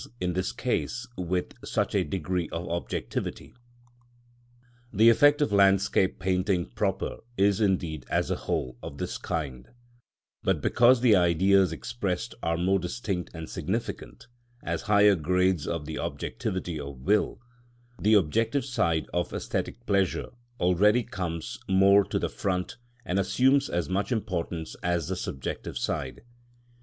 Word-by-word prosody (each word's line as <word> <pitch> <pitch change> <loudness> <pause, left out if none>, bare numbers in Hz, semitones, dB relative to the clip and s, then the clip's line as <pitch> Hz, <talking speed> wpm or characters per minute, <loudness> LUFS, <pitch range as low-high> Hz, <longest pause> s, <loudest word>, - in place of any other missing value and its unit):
_, - - -9
in 90 -1 -1
this 95 +2 -1
case 125 0 -2
with 90 0 -2
such - - -1
a - - +2
degree 90 +2 -2
of 85 +1 -4
objectivity. 85 +1 -4 1.4
The 110 +2 +6
effect 145 +5 +5
of 125 - -1
landscape 100 -1 +3
painting 90 0 0
proper - - -2 0.2
is 100 +2 +3
indeed, 85 -8 0
as - - 0
a - - +1
whole, 60 -1 -3
of - - -8
this - - -4
kind; 65 -6 -4 0.7
but - - +1
because 120 +1 +4
the 120 -4 +6
Ideas 95 +2 +4
expressed 100 -7 -3
are 85 0 0
more 95 +3 +2
distinct 90 0 -3
and 80 -1 -6
significant, - - -4 0.4
as 85 -1 -2
higher 105 0 +6
grades 90 -1 +1
of 85 -3 -3
the 80 +1 -5
objectivity 90 -3 -3
of 70 -3 -8
will, 105 +7 +1 0.6
the 110 +2 +4
objective 115 - +2
side 85 - 0
of 85 0 0
æsthetic 120 - -4
pleasure 100 -2 0 0.3
already 105 +7 +4
comes 85 -6 -5
more 100 +1 +6
to - - -2
the - - 0
front 90 +1 -3 0.3
and 90 +2 0
assumes 130 +8 +3
as 85 -3 -1
much 100 - -1
importance 90 -7 -3
as 85 -3 -1
the - - -1
subjective 65 - -5
side. 70 -4 -3
95 Hz, 140 wpm, -27 LUFS, 85-105 Hz, 1.4 s, The